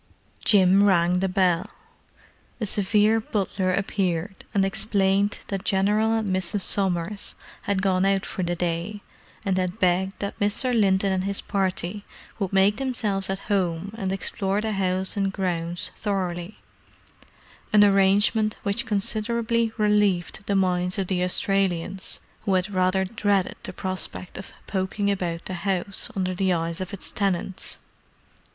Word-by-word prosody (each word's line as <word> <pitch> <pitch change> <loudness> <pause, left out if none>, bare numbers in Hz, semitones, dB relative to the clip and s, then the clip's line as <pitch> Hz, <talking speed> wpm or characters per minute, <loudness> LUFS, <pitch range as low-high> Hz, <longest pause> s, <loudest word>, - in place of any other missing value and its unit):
Jim 195 -1 +5
rang 175 -1 +3
the 190 +1 0
bell. 180 -2 +1 0.9
A 220 - -1
severe 210 +2 +3
butler 195 -3 -1
appeared, 190 -1 -2
and 195 -1 +2
explained 195 0 +1
that 195 -1 -3
General 210 +3 +2
and 210 -4 0
Mrs. 190 +2 +1
Somers 190 0 0 0.3
had 195 -2 +1
gone 185 -1 +2
out 195 0 +2
for - - -4
the 175 -1 -1
day, 175 +4 -3 0.4
and 190 -1 +1
had 185 +2 -2
begged 190 -1 +1
that 200 - -5
Mr. 210 +5 +2
Linton 195 -3 +3
and 190 0 0
his 200 0 -1
party 195 0 -2 0.4
would 195 -3 -1
make 195 +1 +3
themselves 215 -8 -1
at 195 0 -3
home 190 -1 -1
and 195 -4 -3
explore 195 0 -1
the 220 +1 -2
house 190 -1 -1
and 195 -1 0
grounds 175 -3 -2
thoroughly: 185 -2 -3 1.1
an 210 -1 +7
arrangement 205 +2 +3
which 205 +4 -1
considerably 225 +2 0
relieved 210 -3 +1
the 200 - +1
minds 180 -1 +1
of 195 - 0
the 180 -1 0
Australians, 190 0 0 0.2
who 195 -3 +2
had 185 +2 -1
rather 185 +1 +2
dreaded 200 -2 0
the - - -5
prospect 185 -1 -3
of 190 - -9
"poking 200 +1 -1
about" 175 -3 -3
the 185 - -4
house 190 +1 -2
under 185 -1 -1
the 190 +1 +1
eyes 165 +1 -1
of 185 - -5
its 200 - -7
tenants. 190 -2 -1
195 Hz, 145 wpm, -25 LUFS, 185-205 Hz, 1.1 s, an